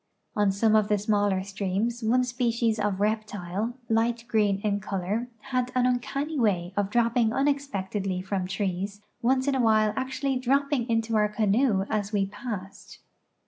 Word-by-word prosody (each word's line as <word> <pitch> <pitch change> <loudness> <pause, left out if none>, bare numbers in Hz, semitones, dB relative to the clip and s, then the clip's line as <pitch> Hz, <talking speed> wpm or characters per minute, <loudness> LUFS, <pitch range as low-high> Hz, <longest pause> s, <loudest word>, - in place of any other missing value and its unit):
On 205 -2 +3
some 215 +3 +2
of 215 -1 +4
the 210 - +2
smaller 205 -2 +1
streams 200 +4 -2
one 245 +3 +3
species 235 -2 0
of 205 -2 0
reptile, 210 +1 -2
light 230 +1 +1
green 210 -3 +2
in 205 -1 0
color, 205 +4 -3 0.2
had 255 -1 0
an 250 -1 +3
uncanny 275 +4 -1
way 185 -6 +1
of 205 -1 0
dropping 235 0 +2
unexpectedly 215 -9 -1
from 190 -1 -2
trees, 195 +1 -3 0.2
once 260 +2 +2
in 280 - +2
awhile 220 -4 +3
actually 265 +1 -1
dropping 270 -1 +1
into 225 0 +1
our 210 -1 +3
canoe 210 -1 +2
as 210 -1 -2
we 200 -2 +1
passed. 205 -1 -7
215 Hz, 150 wpm, -27 LUFS, 200-245 Hz, 0.2 s, of